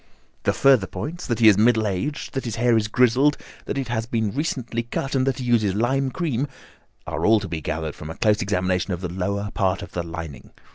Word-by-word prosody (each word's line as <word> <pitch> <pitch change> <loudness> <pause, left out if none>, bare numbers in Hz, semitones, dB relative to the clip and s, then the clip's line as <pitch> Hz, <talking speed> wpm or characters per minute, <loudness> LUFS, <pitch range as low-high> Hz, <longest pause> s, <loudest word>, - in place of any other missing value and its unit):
"The - - +3
further 130 -8 +4
points, 175 +4 -6
that 120 - 0
he 115 - +5
is 105 -2 +6
middle 110 0 +4
aged, 105 +10 -3
that 135 - -3
his 115 -3 -3
hair 120 0 +3
is 110 -1 +2
grizzled, 125 +6 +3 0.3
that - - -3
it 135 - -2
has 115 -1 -2
been 110 -4 -1
recently 130 -4 -2
cut, 120 +4 -4
and 130 -1 +1
that 135 - +1
he 130 - -4
uses 110 -5 +2
lime 130 +5 +1
cream, 145 -4 -1 0.6
are - - -4
all 110 0 +5
to 100 - -6
be 85 -3 -4
gathered 80 0 -3
from 75 - -9
a 80 - -6
close 105 0 +2
examination 95 -2 0
of 90 - -11
the 90 -2 -4
lower 100 +3 -2
part 95 -1 0
of 90 - -10
the 90 - -2
lining. 80 -5 -8
110 Hz, 230 wpm, -23 LUFS, 95-130 Hz, 0.6 s, is